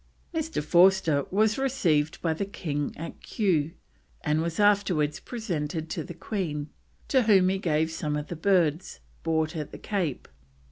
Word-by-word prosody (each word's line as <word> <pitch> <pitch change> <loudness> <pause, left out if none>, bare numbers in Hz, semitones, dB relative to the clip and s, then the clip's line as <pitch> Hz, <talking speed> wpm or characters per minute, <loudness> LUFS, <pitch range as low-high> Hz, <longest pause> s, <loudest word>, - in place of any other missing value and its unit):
Mr. 320 - -2
Forster 175 -3 +4
was 215 +4 +2
received 170 - +1
by 165 -2 +2
the 160 - -2
King 150 -7 -3
at 165 - -7
Kew, 165 -8 0 0.5
and 150 +1 +1
was 165 +2 -3
afterwards 195 -8 +3
presented 165 -8 -4
to - - -2
the 175 -3 -9
Queen, 160 -6 -3 0.4
to 265 - +4
whom 195 -5 +5
he 190 0 0
gave 160 -3 +1
some 150 -2 -2
of 150 - -3
the 175 - -6
birds 170 -1 +1 0.2
bought 160 0 0
at 150 -2 -4
the - - -8
Cape. 180 -10 -2
170 Hz, 155 wpm, -27 LUFS, 155-200 Hz, 0.5 s, whom